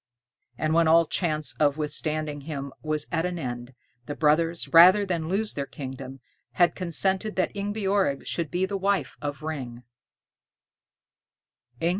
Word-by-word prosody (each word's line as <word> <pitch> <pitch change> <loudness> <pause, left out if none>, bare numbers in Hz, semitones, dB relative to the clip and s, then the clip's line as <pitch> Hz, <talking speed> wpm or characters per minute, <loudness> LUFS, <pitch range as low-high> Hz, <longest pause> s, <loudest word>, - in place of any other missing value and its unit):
And 155 0 0
when 165 0 +4
all 165 +1 +6
chance 155 -6 -1
of 145 -1 +3
withstanding 150 0 -2
him 140 -2 -6
was 155 -1 -2
at 165 -1 0
an 180 0 -2
end, 120 -3 -6 0.3
the 145 - -4
brothers, 165 +2 +1
rather 185 +5 +7
than 170 -4 -2
lose 210 +3 0
their 140 -1 -4
kingdom, 135 -2 -8 0.4
had 175 -1 +3
consented 190 +4 -1
that 185 - 0
Ingebjorg 200 -6 0
should 165 -3 -2
be 180 +3 0
the 200 +1 -3
wife 195 -7 0
of 145 +1 -5
Ring. 130 -6 -5
160 Hz, 140 wpm, -26 LUFS, 145-185 Hz, 0.4 s, rather